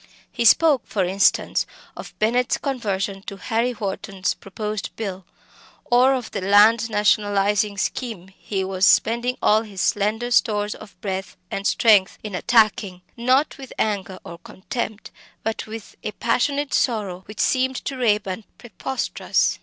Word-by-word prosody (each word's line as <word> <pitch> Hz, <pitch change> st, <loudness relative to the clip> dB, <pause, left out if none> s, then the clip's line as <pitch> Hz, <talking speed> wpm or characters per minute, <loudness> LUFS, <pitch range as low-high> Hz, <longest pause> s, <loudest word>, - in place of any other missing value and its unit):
He 235 Hz, -, -2 dB
spoke, 290 Hz, +1 st, +5 dB
for 195 Hz, -3 st, 0 dB
instance, 195 Hz, +2 st, +2 dB, 0.3 s
of -, -, -10 dB
Bennett's 240 Hz, +3 st, +1 dB
conversion 200 Hz, -7 st, -2 dB
to 200 Hz, -, -6 dB
Harry 230 Hz, +4 st, 0 dB
Wharton's 195 Hz, -3 st, -3 dB
proposed 210 Hz, +1 st, -5 dB
bill, 195 Hz, -4 st, -5 dB, 0.6 s
or 255 Hz, +2 st, +4 dB
of 250 Hz, -3 st, -5 dB
the 200 Hz, -, -3 dB
land 210 Hz, +4 st, +5 dB
nationalising 205 Hz, -1 st, +2 dB
scheme 200 Hz, -4 st, -3 dB
he 195 Hz, 0 st, -4 dB
was 190 Hz, 0 st, -3 dB
spending 235 Hz, +5 st, +3 dB
all 215 Hz, +1 st, +4 dB
his 205 Hz, -4 st, -9 dB
slender 215 Hz, +6 st, 0 dB
stores 210 Hz, -3 st, +2 dB
of 200 Hz, -, -14 dB
breath 190 Hz, -1 st, -4 dB
and 195 Hz, 0 st, -2 dB
strength 210 Hz, -5 st, +4 dB
in 210 Hz, -2 st, -6 dB
attacking, 205 Hz, -4 st, +2 dB
not 260 Hz, +5 st, +1 dB
with 265 Hz, -2 st, -9 dB
anger 195 Hz, -3 st, -1 dB
or 170 Hz, -, -9 dB
contempt, 215 Hz, +4 st, -6 dB, 0.3 s
but 220 Hz, 0 st, -3 dB
with, 220 Hz, -1 st, -9 dB
a 210 Hz, -, -4 dB
passionate 280 Hz, +6 st, 0 dB
sorrow 205 Hz, -7 st, 0 dB
which 210 Hz, -, -11 dB
seemed 260 Hz, 0 st, +2 dB
to 275 Hz, -, -3 dB
Raeburn 210 Hz, -4 st, 0 dB
preposterous! 250 Hz, +2 st, -1 dB
210 Hz, 140 wpm, -22 LUFS, 195-240 Hz, 0.6 s, spoke